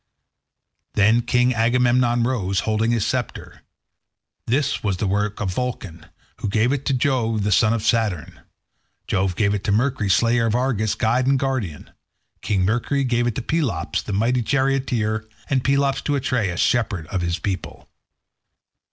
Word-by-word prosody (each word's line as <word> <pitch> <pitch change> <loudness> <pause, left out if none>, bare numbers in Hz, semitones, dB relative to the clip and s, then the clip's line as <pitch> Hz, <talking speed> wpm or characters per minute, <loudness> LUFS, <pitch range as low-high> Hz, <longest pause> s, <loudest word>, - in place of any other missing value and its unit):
Then 110 +3 +4
King 125 +1 +2
Agamemnon 120 +1 +2
rose, 100 -6 0
holding 110 +1 0
his 115 -3 +1
sceptre. 125 -4 -4 0.9
This 140 +4 0
was 100 -3 -1
the 105 - -2
work 105 +2 -1
of 95 -3 -2
Vulcan, 100 -9 -5 0.3
who 105 - -3
gave 110 +4 +2
it 140 -1 -2
to 140 - +2
Jove 120 -5 0
the 105 - 0
son 110 +3 +4
of 115 -2 -1
Saturn. 105 -9 -1 0.7
Jove 95 -2 0
gave 100 0 +1
it 100 - -3
to 100 - +1
Mercury, 115 -1 0
slayer 115 +3 +3
of 110 - 0
Argus, 120 -5 0
guide 125 +3 +1
and 135 0 +3
guardian. 130 - -3 0.5
King 95 -3 0
Mercury 120 +6 0
gave 120 -2 +1
it 120 - -2
to 130 - -3
Pelops, 120 - -1
the - - -7
mighty 115 +5 +1
charioteer, 120 -5 0 0.2
and 130 -2 +1
Pelops 140 0 +1
to 145 - -1
Atreus, 115 -9 -1
shepherd 110 -9 +1
of 95 - -2
his 85 0 -1
people. 95 -1 -5
115 Hz, 160 wpm, -22 LUFS, 105-125 Hz, 0.9 s, Then